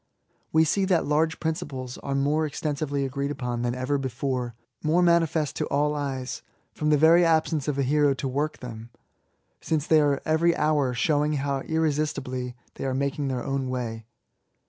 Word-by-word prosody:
We 160 0 +5
see 190 +5 +1
that 185 -3 +2
large 155 +2 +1
principles 135 -6 -4
are 140 - -3
more 150 +3 +1
extensively 145 -1 -2
agreed 140 +1 -2
upon 125 -4 -3
than 120 0 -1
ever 130 +3 -1
before 130 -2 -3
— 120 -2 -40
^more 165 +3 +3
manifest 165 -4 +2
to - - -1
all 145 +1 +1
eyeSf 135 -3 -3 0.3
from 150 - -1
the 150 - +5
very 165 +4 +6
absence 160 -3 +2
of 145 -2 -1
a 140 - +2
hero 145 +1 +3
to 135 - -3
work 145 +4 -1
them^ 115 -2 -8 0.7
since 155 -2 -1
they 155 -1 +5
are 145 -2 +2
every 165 +2 +3
hour 150 -4 +1
showing 150 +3 +2
how 140 -1 -1
irresistibly 140 -5 -1 0.2
they - - -4
are 130 -1 -1
making 140 +1 -1
their 130 -2 -2
own 135 -1 -2
way. 115 -3 -4
145 Hz, 175 wpm, -26 LUFS, 130-155 Hz, 0.7 s, very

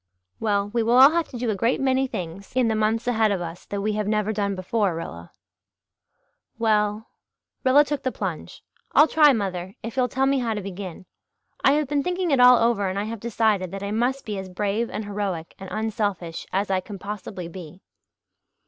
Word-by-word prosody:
"We 205 +1 0
will 235 +2 +3
all 270 +3 +9
have 335 0 0
to 250 - -8
do 235 -2 -1
a - - -1
great 230 +5 +1
many 265 0 +2
things 185 0 -7
in 250 -3 +3
the 220 - +1
months 220 +2 0
ahead 220 -3 +2
of 195 - 0
us 170 0 -7
that 200 0 -3
we 215 +1 0
have 210 -1 -2
never 210 0 0
done 200 -1 -1
before, 190 0 0
Rilla." 85 - -7 1.3
"Well" 215 -1 +1 0.5
Rilla 275 +3 +6
took 290 -1 -3
the 260 - -1
plunge - - -6 0.3
"I'll 300 - +7
try, 300 -2 +6
mother 190 -5 -3
if 230 0 -6
you'll 255 -1 +2
tell 265 +2 0
me 275 0 +2
how 230 -3 -1
to 210 - -3
begin. 190 -2 -7 0.6
I 270 - +6
have 300 -1 +1
been 285 +1 0
thinking 360 +2 -1
it 275 - +3
all 250 0 +8
over 225 -4 +2
and 190 - -4
I 200 - 0
have 225 +1 -5
decided 215 -4 0
that 195 +2 -6
I 200 - -3
must 245 +5 0
be 210 -3 -3
as 190 -1 -7
brave 205 +5 -1
and 215 - -5
heroic 200 -5 -4
and 190 -1 -8
unselfish 205 -6 -3
as 195 +1 0
I 190 - +2
can 200 +2 -8
possibly 195 -2 -6
be." 175 0 -11
215 Hz, 205 wpm, -24 LUFS, 195-245 Hz, 1.3 s, all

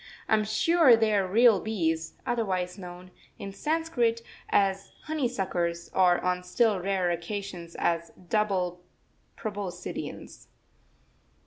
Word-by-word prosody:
I - - +1
am 215 -1 +3
sure 260 +5 +5
they 220 -1 +2
are 195 -2 +2
real 220 +1 +5
bees, 165 -7 -1
otherwise 185 -6 -1
known, 180 -1 -10 0.3
in 195 - -7
Sanskrit, 245 -3 0 0.3
as 195 -1 +1
honey 305 -4 -1
suckers, 175 -7 -2
or 180 -2 +4
on 180 0 0
still 210 +2 +2
rarer 185 -1 0
occasions 175 -1 -5
as 170 0 0 0.2
double 185 -4 0 0.6
proboscideans. 205 -5 -6
195 Hz, 115 wpm, -28 LUFS, 180-225 Hz, 0.6 s, sure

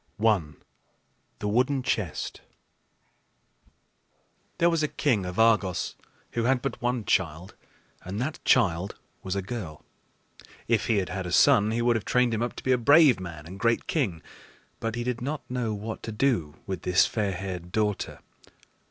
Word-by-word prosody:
I. 110 -3 +4 1.0
THE 105 - -4
WOODEN 130 +5 +1
CHEST. 100 -10 -2 2.2
There 170 - +4
was 165 -2 +1
a 150 - +2
king 115 -12 0
of 90 - -6
Argos 110 -5 +2 0.4
who 115 -1 -1
had 125 0 +2
but 135 -4 -3
one 120 -2 -1
child, 85 0 0 0.5
and 95 +3 -5
that 140 +5 -3
child 95 -6 +2 0.3
was 95 0 -3
a 100 - -2
girl. 95 -8 -6 0.8
If 115 -2 +1
he 115 - +2
had 95 -2 -1
had 95 -1 -4
a - - -5
son, 105 +4 +5
he 115 +1 0
would 120 0 +3
have 110 - -2
trained 125 -2 +2
him 110 - -1
up 120 - -2
to - - -9
be 130 - +1
a 125 - +3
brave 140 - +6
man 80 -5 -8
and 95 +4 -9
great 115 +3 +1
king; 100 - -1 0.6
but 115 0 -3
he 120 - -2
did 125 -1 -2
not 145 +3 -4
know 125 -3 -1
what 110 +2 -6
to 115 - -6
do 105 - 0
with 95 -4 -4
this 90 0 +4
fair 105 -3 -1
haired 90 -1 -6
daughter. 105 -1 -1
110 Hz, 170 wpm, -27 LUFS, 95-125 Hz, 2.2 s, brave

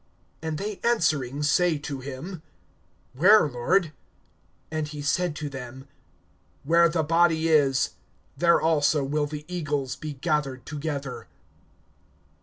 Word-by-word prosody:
(37)And 160 -1 -3
they 205 +2 -5
answering 150 - +1
say 170 +2 +3
to 145 -1 -6
him: 140 +7 -7 0.7
Where, 185 +7 +6
Lord? 145 +7 +1 0.8
And 155 -1 -2
he 150 0 -8
said 170 +2 0
to 155 -1 -4
them: 135 -1 -8 0.8
Where 170 +3 +4
the 165 -1 0
body 165 0 +2
is, 140 -4 +3 0.4
there 170 +3 +4
also 155 -2 +2
will 145 +2 -1
the 150 0 -7
eagles 145 -8 -2
be 150 +2 -6
gathered 140 -3 -2
together. 145 -3 -5
150 Hz, 120 wpm, -26 LUFS, 140-165 Hz, 0.8 s, Where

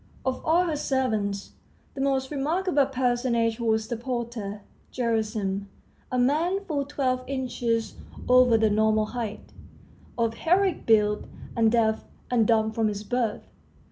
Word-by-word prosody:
Of 260 -1 -2
all 340 +3 +3
her 325 -3 -1
servants, 220 -9 -1 0.4
the 270 - -5
most 270 -1 0
remarkable 300 +1 +1
personage 245 -3 0
was 220 -1 +1
the 240 - -2
porter, 235 -4 -4 0.3
Gerasim, 215 -4 -1 0.4
a 255 - 0
man 325 +10 +1
full 285 -5 -1
twelve 260 -3 -1
inches 245 -4 -1 0.3
over 250 -2 +6
the 220 -1 +2
normal 215 0 +3
height, 220 -2 -6 0.6
of 230 -1 +1
heroic 360 +8 +1
build, 210 -2 +3 0.3
and 225 -1 +3
deaf 220 -2 +2 0.3
and 230 -3 +3
dumb 220 -1 +3
from 220 0 0
his 205 -1 -3
birth. 235 -1 -1
235 Hz, 135 wpm, -26 LUFS, 220-265 Hz, 0.6 s, over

